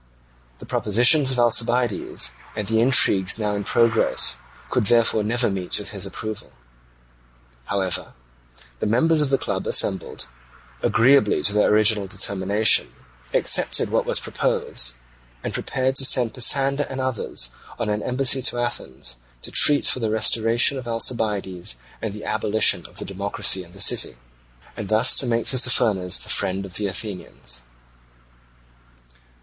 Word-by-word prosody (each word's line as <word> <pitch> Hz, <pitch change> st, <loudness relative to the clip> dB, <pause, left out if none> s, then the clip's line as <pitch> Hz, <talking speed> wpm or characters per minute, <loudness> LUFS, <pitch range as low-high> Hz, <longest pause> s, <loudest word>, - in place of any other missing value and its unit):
The -, -, -12 dB
propositions 125 Hz, +7 st, +2 dB
of 130 Hz, -, 0 dB
Alcibiades, 120 Hz, -1 st, +1 dB, 0.2 s
and 105 Hz, -2 st, -4 dB
the 110 Hz, +1 st, +1 dB
intrigues 110 Hz, -7 st, +3 dB
now 105 Hz, -2 st, -2 dB
in 100 Hz, 0 st, -3 dB
progress, 115 Hz, +2 st, +2 dB, 0.3 s
could 105 Hz, -, 0 dB
therefore 115 Hz, -1 st, +2 dB
never 120 Hz, +3 st, +1 dB
meet 95 Hz, -3 st, -2 dB
with 105 Hz, -, -6 dB
his 100 Hz, -2 st, -4 dB
approval. 110 Hz, +2 st, -6 dB, 1.1 s
However, 95 Hz, -2 st, -2 dB, 0.6 s
the -, -, -2 dB
members 155 Hz, +9 st, +2 dB
of 145 Hz, -, 0 dB
the 135 Hz, -, +2 dB
club -, -, -4 dB
assembled, -, -, 0 dB, 0.6 s
agreeably 120 Hz, -2 st, +3 dB
to 100 Hz, -, 0 dB
their 105 Hz, -, +2 dB
original 105 Hz, -1 st, +3 dB
determination, 100 Hz, -, +1 dB, 0.4 s
accepted -, -, +1 dB
what -, -, 0 dB
was -, -, +3 dB
proposed, -, -, -2 dB, 0.5 s
and -, -, -4 dB
prepared 130 Hz, +1 st, -2 dB
to 135 Hz, -, +4 dB
send 125 Hz, -3 st, +2 dB
Pisander 135 Hz, +3 st, +2 dB
and 135 Hz, -, -6 dB
others 120 Hz, -, -1 dB, 0.3 s
on 115 Hz, -, -3 dB
an 105 Hz, 0 st, -2 dB
embassy 130 Hz, +2 st, +1 dB
to 125 Hz, -, 0 dB
Athens 65 Hz, -, -4 dB, 0.3 s
to -, -, -8 dB
treat 145 Hz, -1 st, +3 dB
for -, -, +3 dB
the 110 Hz, -2 st, -2 dB
restoration 115 Hz, +4 st, +3 dB
of 125 Hz, -, -10 dB
Alcibiades 105 Hz, -, -1 dB, 0.3 s
and 110 Hz, -, -4 dB
the 105 Hz, +1 st, -10 dB
abolition 110 Hz, 0 st, +1 dB
of -, -, -15 dB
the -, -, -3 dB
democracy 100 Hz, -1 st, -1 dB
in 85 Hz, 0 st, -18 dB
the 100 Hz, -, -14 dB
city, 100 Hz, -, +3 dB, 0.6 s
and 105 Hz, -, -7 dB
thus 110 Hz, +4 st, +4 dB
to 130 Hz, -, +1 dB
make 115 Hz, -1 st, -1 dB
Tissaphernes 115 Hz, -8 st, +2 dB
the -, -, -6 dB
friend 95 Hz, +1 st, 0 dB
of 95 Hz, -, -10 dB
the 105 Hz, -, -1 dB
Athenians. 90 Hz, -, -4 dB
110 Hz, 145 wpm, -22 LUFS, 100-125 Hz, 1.1 s, to